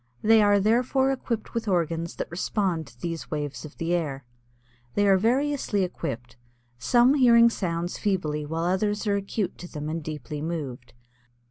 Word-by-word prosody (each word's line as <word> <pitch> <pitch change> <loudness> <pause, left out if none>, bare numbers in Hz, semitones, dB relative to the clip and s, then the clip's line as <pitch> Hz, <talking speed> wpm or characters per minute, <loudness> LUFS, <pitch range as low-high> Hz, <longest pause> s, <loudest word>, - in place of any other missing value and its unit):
They 225 0 +6
are 205 -1 +5
therefore 250 +6 +2
equipped 240 -4 -3
with 230 -2 -3
organs 170 -3 0
that - - -5
respond 175 -3 -1
to 120 +1 -18
these 165 +3 -5
waves 145 -1 -4
of 150 - -12
the 165 +1 -1
air. 145 -6 -2 0.7
They 205 - +3
are 195 - +6
variously 245 0 +1
equipped, 125 -10 -5 0.4
some 240 - +4
hearing 235 -4 +6
certain 185 -5 -2
sounds 175 - -5
feebly 155 -7 -1
where 160 +2 -3
others 205 +4 0
are 205 -1 +2
acute 200 0 -3
to 175 - -9
them 150 -1 -5
and 165 0 -3
deeply 150 -1 -6
moved. 145 -8 -5
180 Hz, 165 wpm, -26 LUFS, 155-220 Hz, 0.7 s, They